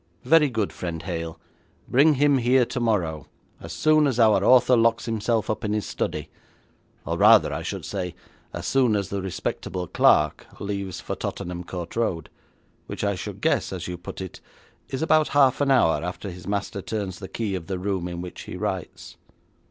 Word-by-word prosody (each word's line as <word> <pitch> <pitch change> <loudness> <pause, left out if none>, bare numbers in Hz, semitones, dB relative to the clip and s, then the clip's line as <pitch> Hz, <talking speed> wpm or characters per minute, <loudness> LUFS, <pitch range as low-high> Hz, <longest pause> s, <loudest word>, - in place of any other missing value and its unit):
'Very 150 +2 +5
good, 110 -5 -2
friend 85 -3 -5
Hale, 85 -2 -5 0.5
bring 145 +4 +4
him 140 0 +3
here 125 +1 +4
tomorrow, 100 - -1 0.3
as - - -9
soon 155 -1 +3
as 125 -3 -1
our 110 -2 +5
author 125 0 +6
locks 115 0 +2
himself 115 0 0
up 110 - -2
in 105 0 -1
his 105 -2 -1
study, - - -4 0.7
or - - -2
rather, - - +6
I - - -3
should - - -5
say, 90 -3 -4 0.4
as - - -6
soon 125 -5 +3
as 100 -2 -1
the 100 -1 -3
respectable 90 0 -4
clerk 75 -2 +3
leaves 100 -2 -4
for - - -4
Tottenham 90 0 -5
Court 85 -1 -7
Road, 90 -9 -1 0.6
which - - -5
I 100 0 +1
should 90 - -7
guess, - - +1
as - - -5
you 90 - -4
put 90 +2 -8
it, 95 - -8 0.5
is 135 +3 -3
about 155 -1 +4
half 135 -1 +4
an 140 - +2
hour 120 -13 +3
after 90 +2 -5
his 90 +1 -11
master 100 0 -2
turns 100 -3 -4
the 95 - -7
key 110 -2 -3
of 90 -3 -5
the 95 -1 -2
room 95 -1 -2
in 85 -1 -5
which 90 0 -8
he - - -7
writes.' - - -5
100 Hz, 185 wpm, -24 LUFS, 90-125 Hz, 0.7 s, author